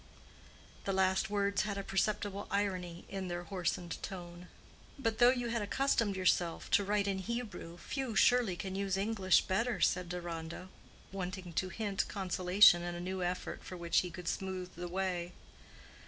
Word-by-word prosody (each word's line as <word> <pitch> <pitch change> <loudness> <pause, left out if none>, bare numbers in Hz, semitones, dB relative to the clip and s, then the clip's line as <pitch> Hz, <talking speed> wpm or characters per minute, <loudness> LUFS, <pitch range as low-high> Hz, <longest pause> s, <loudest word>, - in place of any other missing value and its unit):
The 195 - 0
last 190 +2 +2
words 200 -1 +1
had 200 0 -2
a 200 - -3
perceptible 205 +1 -1
irony 185 -4 -2
in 195 -1 -4
their 175 0 -3
hoarsened 175 -2 -3
tone. 175 -1 -7 0.5
"But 225 -5 -1
though 240 0 +8
you 245 -2 0
had 230 -1 0
accustomed 230 -1 +1
yourself 180 -2 +1
to 205 - +5
write 205 0 +1
in 195 -1 0
Hebrew, 205 -5 -5
few, 260 +4 -4
surely, 245 -7 +4
can 190 +2 -5
use 195 -1 -1
English 195 -2 +3
better," 225 +5 0
said 180 -2 +2
Deronda, 170 0 -5 0.4
wanting 185 -2 -5
to 185 +3 0
hint 205 +1 -1
consolation 185 -1 +5
in 175 0 -4
a - - -5
new 185 +1 -3
effort 180 +1 -3
for 185 - -7
which 170 -1 +2
he 180 - -2
could 180 +1 -9
smooth 185 -1 -3
the 175 +1 -5
way. 180 -1 -2
190 Hz, 165 wpm, -33 LUFS, 180-205 Hz, 0.5 s, though